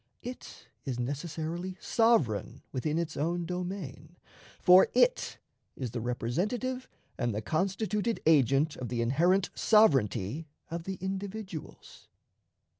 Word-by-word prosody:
It 250 +1 -9 0.2
is 130 -3 -3
necessarily 160 +7 -4
sovereign 170 - +1
within 150 +4 -1
its 165 -2 -2
own 170 +4 -1
domain, 175 -4 -5 0.4
for 180 +1 +7
it - - +3 0.4
is 125 -4 -4
the 120 - -4
representative 205 - -2 0.3
and 120 -4 0
the 105 - -2
constituted 200 - 0
agent 145 0 +4
of 125 -3 -5
the 120 -1 0
inherent 175 +10 +2
sovereignty 145 - +3 0.2
of 170 0 -4
the 190 - -3
individuals. 190 -1 -6
165 Hz, 115 wpm, -30 LUFS, 135-195 Hz, 0.4 s, for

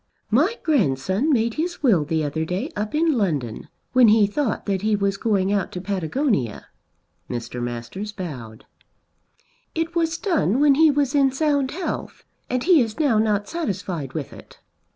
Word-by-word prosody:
"My 315 - +3
grandson 200 - +1
made 230 -3 +2
his 335 +3 -3
will 200 - +4
the 160 0 0
other 150 +2 -2
day 180 +4 -3
up 210 +5 -3
in 325 +1 +3
London, 145 - -2 0.3
when 255 -2 +6
he 215 0 +6
thought 220 +3 -2
that 195 -2 -1
he 215 0 +2
was 200 -1 0
going 200 -2 +1
out 200 -2 -1
to 180 - -4
Patagonia." 190 - -1 0.6
Mr. 120 0 -5
Masters 120 - -5
bowed. 130 - -8 1.1
"It 330 +1 -2
was 330 0 +1
done 310 - +1
when 290 -1 +5
he 315 +3 +5
was 285 -2 +1
in 275 -2 +4
sound 285 -1 +1
health, 355 +6 -5 0.3
and 250 0 -1
he 345 -5 +5
is 225 +1 -3
now 270 -8 +3
not 210 -2 +1
satisfied 185 - -4
with 150 -4 -5
it." - - -15
215 Hz, 165 wpm, -23 LUFS, 175-285 Hz, 1.1 s, when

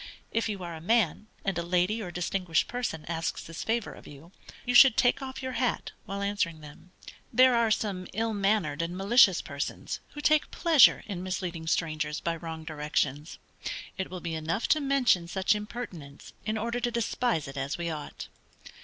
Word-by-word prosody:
If 230 0 0
you 200 -3 -4
are 170 -1 -5
a 160 - -8
man, 210 0 +1 0.2
and 195 -2 0
a - - 0
lady 180 +6 +1
or 185 - -5
distinguished 175 -1 0
person 240 -11 -3
asks 165 0 -2
this 165 0 -7
favor 230 -1 -1
of - - -14
you, 145 +5 -13 0.3
you 245 - 0
should 260 -1 +8
take 245 +3 +3
off 265 0 -6
your 260 - -3
hat 250 -1 -1 0.2
while 200 0 -3
answering 200 -6 -1
them. 150 +4 -14 0.4
There 255 +2 +6
are 235 -1 +3
some 200 -4 -1
ill 225 +2 -1
mannered 195 -7 +1
and 170 +2 -3
malicious 200 -2 +5
persons, 140 -1 -4
who 295 - -8
take 305 0 +3
pleasure 325 -7 +5
in 190 -4 -5
misleading 180 -3 -4
strangers 155 -2 -1
by 170 0 -1
wrong 160 -1 -7
directions. 150 -1 -2 0.6
It 190 - -4
will 185 -1 -7
be 170 -1 -4
enough 160 +6 -1
to 310 - +4
mention 260 -11 +2
such 190 +3 +2
impertinence 210 -9 -7
in 215 +1 0
order 235 +2 -2
to 240 0 0
despise 235 - 0
it 135 - -8
as 135 +2 -3
we 170 -1 -2
ought. 150 -2 -7
185 Hz, 185 wpm, -28 LUFS, 165-230 Hz, 0.6 s, should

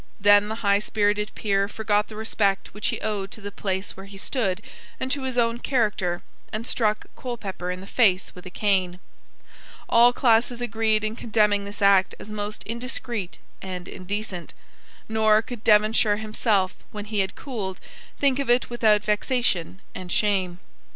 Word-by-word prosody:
Then 205 +1 +6
the 220 - -3
high 200 0 +4
spirited 210 0 0
peer 200 -2 +1
forgot 210 0 0
the 215 - -10
respect 205 -3 0
which 210 - -2
he - - -1
owed 205 -3 -2
to 220 - -10
the 205 -1 -7
place 190 -1 -3
where 195 +1 -10
he 195 0 -11
stood 195 -3 -1 0.4
and 260 0 -2
to 285 0 0
his 260 -1 -3
own 230 0 +2
character, 210 -9 0 0.3
and 215 +2 -4
struck 215 -4 0
Colepepper 200 -8 -5
in 180 0 -4
the - - -9
face 195 -4 +2
with 180 0 -11
a - - -7
cane. 185 -2 +1 0.9
All 235 +1 +6
classes 240 -1 +2
agreed 220 -2 +1
in 215 +1 -2
condemning 210 -3 +2
this 205 0 -5
act 195 -1 +5
as 210 - -10
most 210 0 -4
indiscreet 235 -4 -3 0.2
and 180 -2 -6
indecent; 190 -1 -5 0.5
nor 220 -1 +4
could 235 -1 -8
Devonshire 215 0 +4
himself, 215 -3 0 0.2
when 210 -1 -6
he 210 -1 -2
had 190 -1 0
cooled, 205 -9 -5 0.4
think 280 -1 +2
of 275 - -2
it 245 0 +3
without 215 -3 +3
vexation 210 -5 0
and 180 -1 -7
shame. 190 -4 +1
210 Hz, 165 wpm, -25 LUFS, 195-225 Hz, 0.9 s, Then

